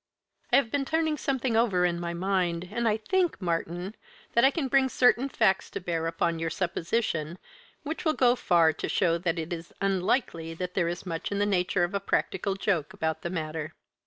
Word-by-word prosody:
"I -, -, +5 dB
have 235 Hz, -5 st, +3 dB
been 285 Hz, -1 st, +1 dB
turning 315 Hz, +2 st, 0 dB
something 265 Hz, -4 st, -1 dB
over 200 Hz, -6 st, +3 dB
in 170 Hz, -1 st, 0 dB
my 170 Hz, 0 st, -3 dB
mind, 180 Hz, -1 st, -1 dB
and 235 Hz, +2 st, 0 dB
I 215 Hz, -1 st, +2 dB
think, 360 Hz, -, 0 dB
Martyn, 175 Hz, +1 st, -2 dB, 0.4 s
that 235 Hz, -, +4 dB
I 265 Hz, -, +8 dB
can 285 Hz, -1 st, -2 dB
bring 265 Hz, 0 st, +3 dB
certain 250 Hz, +1 st, +3 dB
facts 195 Hz, -7 st, +2 dB
to -, -, -5 dB
bear 165 Hz, -3 st, -2 dB
upon 165 Hz, 0 st, -1 dB
your 165 Hz, 0 st, -1 dB
supposition 170 Hz, -1 st, -2 dB, 0.5 s
which 315 Hz, +2 st, -4 dB
will 315 Hz, -3 st, +2 dB
go 245 Hz, -1 st, +4 dB
far 170 Hz, -8 st, +3 dB
to -, -, -4 dB
show 170 Hz, -3 st, +2 dB
that 170 Hz, -1 st, -1 dB
it 165 Hz, +2 st, -3 dB
is 165 Hz, 0 st, -7 dB
unlikely 185 Hz, -3 st, 0 dB
that 180 Hz, +1 st, -4 dB
there 175 Hz, -3 st, +1 dB
is 175 Hz, +2 st, -4 dB
much 165 Hz, 0 st, -4 dB
in 200 Hz, -, -1 dB
the 205 Hz, -, +2 dB
nature 180 Hz, -2 st, +1 dB
of 175 Hz, +3 st, -1 dB
a 200 Hz, -, +1 dB
practical 195 Hz, 0 st, -1 dB
joke 190 Hz, -6 st, -1 dB
about 160 Hz, 0 st, -2 dB
the 170 Hz, -, -3 dB
matter. 155 Hz, -3 st, -4 dB
185 Hz, 205 wpm, -28 LUFS, 170-235 Hz, 0.5 s, I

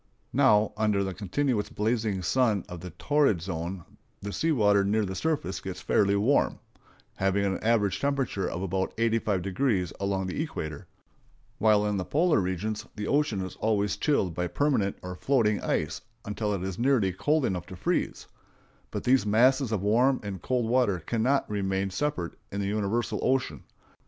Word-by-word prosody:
Now, 105 Hz, 0 st, +4 dB
under 105 Hz, -2 st, +2 dB
the 95 Hz, -1 st, -3 dB
continuous 105 Hz, +4 st, -1 dB
blazing 105 Hz, -3 st, -1 dB
sun 110 Hz, +1 st, +2 dB
of 90 Hz, -3 st, -8 dB
the 90 Hz, +2 st, -7 dB
torrid 140 Hz, -, +2 dB
zone 85 Hz, +1 st, -4 dB, 0.4 s
the 100 Hz, 0 st, -6 dB
sea 165 Hz, -, +1 dB
water 105 Hz, -7 st, +4 dB
near 105 Hz, +2 st, +1 dB
the 95 Hz, -, -4 dB
surface 95 Hz, -, -1 dB
gets 95 Hz, -2 st, -6 dB
fairly 100 Hz, 0 st, +2 dB
warm,—having 100 Hz, -4 st, -1 dB
an 95 Hz, -1 st, -1 dB
average 110 Hz, -4 st, +2 dB
temperature 135 Hz, -8 st, -1 dB
of 90 Hz, -, -4 dB
about 95 Hz, 0 st, -2 dB
85° 105 Hz, -3 st, 0 dB
along 100 Hz, -1 st, -1 dB
the 95 Hz, +10 st, -3 dB
equator,—while 105 Hz, -, -3 dB
in 105 Hz, -1 st, 0 dB
the 90 Hz, -, -1 dB
polar 160 Hz, 0 st, +2 dB
regions 95 Hz, +3 st, -2 dB
the 105 Hz, -, -4 dB
ocean 140 Hz, -8 st, +1 dB
is 95 Hz, -, -6 dB
always 105 Hz, -2 st, +1 dB
chilled 100 Hz, -, +1 dB
by 90 Hz, +1 st, -2 dB
permanent 130 Hz, -6 st, 0 dB
or 90 Hz, 0 st, -5 dB
floating 110 Hz, -2 st, +1 dB
ice 75 Hz, 0 st, -1 dB, 0.2 s
until 105 Hz, +1 st, -2 dB
it 90 Hz, -, -4 dB
is 95 Hz, -1 st, -4 dB
nearly 120 Hz, -7 st, +2 dB
cold 145 Hz, -, +1 dB
enough 90 Hz, -3 st, -2 dB
to -, -, -8 dB
freeze; -, -, -1 dB, 0.6 s
but -, -, -4 dB
these 125 Hz, -4 st, +3 dB
masses 125 Hz, +4 st, +3 dB
of 105 Hz, -4 st, -1 dB
warm 125 Hz, +6 st, +3 dB
and 100 Hz, -4 st, -5 dB
cold 125 Hz, -3 st, 0 dB
water 120 Hz, -5 st, +2 dB
cannot 120 Hz, -, +1 dB
remain 95 Hz, -1 st, -1 dB
separate 95 Hz, -, -2 dB, 0.2 s
in 100 Hz, -, -3 dB
the 100 Hz, -, -1 dB
universal 105 Hz, +3 st, -1 dB
ocean. 130 Hz, -, 0 dB
105 Hz, 160 wpm, -27 LUFS, 95-125 Hz, 0.6 s, Now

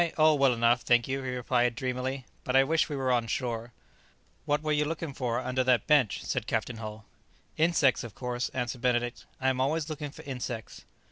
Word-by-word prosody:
Oh, 155 Hz, 0 st, +6 dB
well 140 Hz, -3 st, +4 dB
enough, 120 Hz, 0 st, +3 dB
thank 120 Hz, -1 st, +3 dB
you," 135 Hz, +1 st, -2 dB
he 130 Hz, -, -4 dB
replied 125 Hz, -1 st, +1 dB
dreamily; 130 Hz, +1 st, -3 dB, 0.2 s
"but 130 Hz, -, -1 dB
I 135 Hz, -, +7 dB
wish 160 Hz, +4 st, +1 dB
we 145 Hz, -, -3 dB
were 130 Hz, -2 st, 0 dB
on 120 Hz, -2 st, +1 dB
shore." 120 Hz, 0 st, -3 dB, 0.7 s
"What 145 Hz, 0 st, 0 dB
were 155 Hz, -, 0 dB
you 150 Hz, 0 st, +3 dB
looking 155 Hz, -1 st, -4 dB
for 120 Hz, -3 st, -1 dB
under 130 Hz, 0 st, 0 dB
that 125 Hz, -3 st, +3 dB
bench?" 140 Hz, -9 st, +3 dB
said 125 Hz, -3 st, -2 dB
Captain 115 Hz, +1 st, -1 dB
Hull. 110 Hz, -1 st, -7 dB, 0.5 s
"Insects, 155 Hz, -5 st, +3 dB
of 115 Hz, -3 st, -9 dB
course," 125 Hz, -1 st, -3 dB
answered 125 Hz, -1 st, -3 dB
Benedict; 120 Hz, 0 st, 0 dB
"I 130 Hz, -, +2 dB
am 130 Hz, -1 st, 0 dB
always 155 Hz, +3 st, 0 dB
looking 150 Hz, -1 st, -4 dB
for -, -, -12 dB
insects." 125 Hz, -4 st, -6 dB
130 Hz, 200 wpm, -29 LUFS, 120-140 Hz, 0.7 s, I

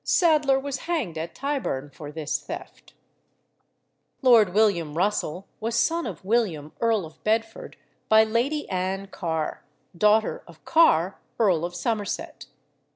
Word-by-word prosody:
Sadler 300 Hz, -6 st, +3 dB
was 280 Hz, 0 st, -4 dB
hanged 275 Hz, -, -1 dB
at 165 Hz, +1 st, -6 dB
Tyburn 260 Hz, -, -3 dB
for 145 Hz, +1 st, -9 dB
this 150 Hz, -1 st, -3 dB
theft. 360 Hz, +3 st, -9 dB, 1.3 s
Lord 230 Hz, -7 st, +6 dB
William 175 Hz, -7 st, +2 dB
Russell 190 Hz, -2 st, -1 dB
was 225 Hz, +1 st, -2 dB
son 330 Hz, +8 st, +1 dB
of -, -, -8 dB
William, 190 Hz, -9 st, 0 dB
Earl 225 Hz, -5 st, +2 dB
of 160 Hz, 0 st, -15 dB
Bedford, 225 Hz, +1 st, -2 dB, 0.3 s
by 220 Hz, 0 st, +7 dB
Lady 245 Hz, +7 st, -1 dB
Ann 190 Hz, +1 st, -2 dB
Carr, 160 Hz, -5 st, -3 dB, 0.3 s
daughter 210 Hz, +4 st, +3 dB
of -, -, -17 dB
Carr, 195 Hz, -, +4 dB, 0.2 s
Earl 185 Hz, -8 st, +3 dB
of 175 Hz, 0 st, -6 dB
Somerset. 205 Hz, +3 st, -3 dB
210 Hz, 130 wpm, -25 LUFS, 170-240 Hz, 1.3 s, by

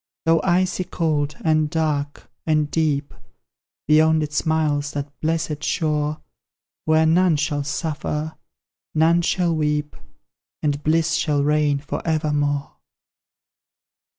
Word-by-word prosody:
Though 165 Hz, -1 st, +4 dB
icy 185 Hz, 0 st, +1 dB
cold, 155 Hz, -4 st, -1 dB
and 155 Hz, -1 st, +2 dB
dark, 150 Hz, -3 st, -2 dB, 0.2 s
and 155 Hz, -1 st, +1 dB
deep; 150 Hz, -3 st, 0 dB, 0.7 s
Beyond 155 Hz, +1 st, +4 dB
it 150 Hz, 0 st, -5 dB
smiles 150 Hz, -1 st, 0 dB
that 145 Hz, 0 st, -4 dB
blessed 160 Hz, -1 st, -2 dB
shore, 150 Hz, -1 st, -1 dB, 0.6 s
Where 155 Hz, 0 st, +4 dB
none 170 Hz, +1 st, +4 dB
shall 145 Hz, 0 st, -1 dB
suffer, 150 Hz, +1 st, -3 dB, 0.6 s
none 165 Hz, +2 st, +4 dB
shall 170 Hz, -1 st, +1 dB
weep, 150 Hz, -1 st, -1 dB, 0.7 s
And 145 Hz, -1 st, 0 dB
bliss 160 Hz, +1 st, +2 dB
shall 145 Hz, -3 st, +1 dB
reign 150 Hz, -1 st, +2 dB
for 145 Hz, +2 st, -5 dB
evermore! 150 Hz, -3 st, -1 dB
155 Hz, 110 wpm, -22 LUFS, 145-160 Hz, 0.7 s, Though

